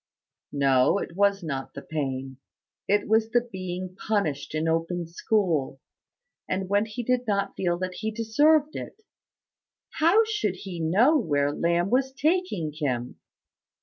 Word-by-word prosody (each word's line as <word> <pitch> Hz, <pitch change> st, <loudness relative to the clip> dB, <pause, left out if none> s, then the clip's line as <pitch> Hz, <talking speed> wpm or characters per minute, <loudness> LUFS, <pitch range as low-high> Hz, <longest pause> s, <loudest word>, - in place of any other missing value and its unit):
No 135 Hz, +3 st, +3 dB
it 170 Hz, -, -5 dB
was 200 Hz, -1 st, +2 dB
not 135 Hz, -4 st, -5 dB
the -, -, -7 dB
pain. 135 Hz, -3 st, -4 dB, 0.5 s
It 205 Hz, +1 st, +2 dB
was 220 Hz, +1 st, +3 dB
the 240 Hz, +1 st, +3 dB
being 185 Hz, -5 st, -6 dB
punished 160 Hz, -10 st, -2 dB
in 155 Hz, +1 st, 0 dB
open 165 Hz, +2 st, -1 dB
school, 165 Hz, -6 st, 0 dB, 0.7 s
and 190 Hz, 0 st, -1 dB
when 205 Hz, +3 st, +1 dB
he 225 Hz, +3 st, -5 dB
did 250 Hz, 0 st, 0 dB
not 200 Hz, -1 st, 0 dB
feel 175 Hz, -2 st, 0 dB
that 185 Hz, 0 st, -3 dB
he 220 Hz, +4 st, -3 dB
deserved 290 Hz, +8 st, +2 dB
it. 440 Hz, -, -8 dB, 0.9 s
How 345 Hz, +8 st, +4 dB
should 420 Hz, -, -1 dB
he 180 Hz, -2 st, -7 dB
know 215 Hz, -, +4 dB
where 145 Hz, -, +1 dB
Lamb 170 Hz, +3 st, +1 dB
was 265 Hz, +1 st, +1 dB
taking 290 Hz, -, 0 dB
him? 125 Hz, -5 st, -3 dB
190 Hz, 145 wpm, -26 LUFS, 160-225 Hz, 0.9 s, How